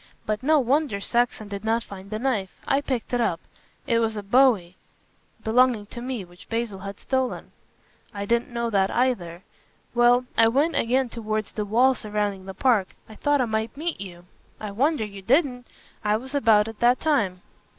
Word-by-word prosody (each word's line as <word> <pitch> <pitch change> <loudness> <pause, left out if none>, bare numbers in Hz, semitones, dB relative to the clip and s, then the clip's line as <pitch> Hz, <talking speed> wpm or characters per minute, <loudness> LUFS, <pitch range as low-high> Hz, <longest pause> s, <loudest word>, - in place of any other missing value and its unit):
But 215 0 -1
no 310 +4 +4
wonder 270 -4 +1
Saxon 235 0 0
did 200 0 -6
not 225 +1 +1
find 195 -2 -10
the 215 - -3
knife. 220 -6 -1 0.2
I 275 +1 +2
picked 255 -4 -3
it 245 - +2
up. - - 0 0.5
It 235 -4 +2
was 225 -1 0
a 205 - -4
bowie 205 -5 +3 0.3
" - - -36
"Belonging 235 -1 +3
to 240 - -6
me, 245 -5 -4
which 175 0 -17
Basil 225 -4 -2
had 200 +1 -7
stolen." 260 -1 -2 0.6
"I 200 -2 -5
didn't 235 +3 +1
know 235 -1 -2
that 195 -2 +2
either. 190 -9 -1 0.5
Well, 240 +1 +4
I 225 -1 +6
went 285 +8 +2
again 255 +2 +1
towards 215 -2 -3
the 210 - -3
wall 245 +6 +4
surrounding 205 -4 -3
the 190 - -7
park. 225 -8 +2
I 220 - -12
thought 290 +4 +1
I - - +2
might 220 +3 -2
meet 325 - -3
you." 175 -3 -9 0.3
"I 210 -1 -5
wonder 260 +3 +1
you 200 -2 -9
didn't. 250 - +1 0.4
I 210 0 +2
was 260 +4 -8
about 225 -6 +4
at 225 -1 -8
that 245 +1 +4
time." 205 - 0
230 Hz, 190 wpm, -25 LUFS, 205-255 Hz, 0.6 s, I